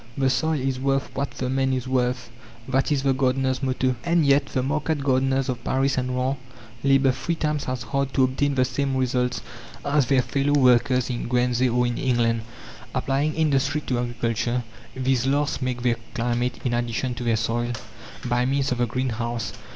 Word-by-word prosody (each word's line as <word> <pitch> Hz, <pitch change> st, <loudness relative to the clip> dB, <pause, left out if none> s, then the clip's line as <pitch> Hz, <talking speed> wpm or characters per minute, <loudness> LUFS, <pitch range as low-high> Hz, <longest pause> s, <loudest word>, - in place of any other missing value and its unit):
"The 135 Hz, -1 st, +2 dB
soil 160 Hz, +2 st, +1 dB
is 130 Hz, 0 st, -1 dB
worth 135 Hz, 0 st, 0 dB
what 140 Hz, +1 st, -2 dB
the 130 Hz, -, -2 dB
man 135 Hz, 0 st, +1 dB
is 130 Hz, 0 st, -2 dB
worth," 125 Hz, -2 st, 0 dB, 0.4 s
that 135 Hz, +2 st, +1 dB
is 140 Hz, -2 st, +1 dB
the 135 Hz, -1 st, +3 dB
gardeners' 130 Hz, 0 st, +1 dB
motto. 130 Hz, -1 st, 0 dB
And 170 Hz, -2 st, +2 dB
yet 140 Hz, 0 st, +4 dB
the 130 Hz, -, -1 dB
market 150 Hz, +1 st, -1 dB
gardeners 135 Hz, 0 st, +2 dB
of 120 Hz, -2 st, -3 dB
Paris 135 Hz, +1 st, +1 dB
and 125 Hz, 0 st, -1 dB
Rouen 130 Hz, +2 st, 0 dB, 0.5 s
labour 135 Hz, -1 st, +4 dB
three 130 Hz, +7 st, -2 dB
times 150 Hz, -2 st, -1 dB
as 130 Hz, -1 st, -2 dB
hard 140 Hz, +3 st, -1 dB
to 135 Hz, -, +4 dB
obtain 135 Hz, +2 st, +1 dB
the 130 Hz, -1 st, +3 dB
same 135 Hz, +1 st, -1 dB
results 125 Hz, -1 st, 0 dB, 0.4 s
as 140 Hz, -2 st, +2 dB
their 135 Hz, -2 st, +3 dB
fellow 140 Hz, +2 st, 0 dB
workers 125 Hz, 0 st, +3 dB
in 120 Hz, -, -3 dB
Guernsey 125 Hz, +1 st, +2 dB
or 125 Hz, +1 st, +2 dB
in 120 Hz, -1 st, -2 dB
England. 120 Hz, -3 st, +1 dB, 0.5 s
Applying 140 Hz, +3 st, 0 dB
industry 145 Hz, -1 st, +1 dB
to 125 Hz, -4 st, -1 dB
agriculture, 120 Hz, 0 st, -1 dB, 0.3 s
these 130 Hz, -1 st, +1 dB
last 145 Hz, +1 st, 0 dB
make 125 Hz, -1 st, -2 dB
their 120 Hz, -2 st, +2 dB, 0.2 s
climate 120 Hz, +1 st, -1 dB
in 120 Hz, -, +1 dB
addition 120 Hz, +1 st, -1 dB
to 120 Hz, -, -6 dB
their 115 Hz, -2 st, +2 dB
soil, 120 Hz, +2 st, -1 dB, 0.5 s
by 120 Hz, 0 st, +1 dB
means 135 Hz, +1 st, 0 dB
of 125 Hz, -, -1 dB
the 120 Hz, -, +2 dB
greenhouse. 120 Hz, -2 st, -2 dB
130 Hz, 185 wpm, -24 LUFS, 125-135 Hz, 0.5 s, yet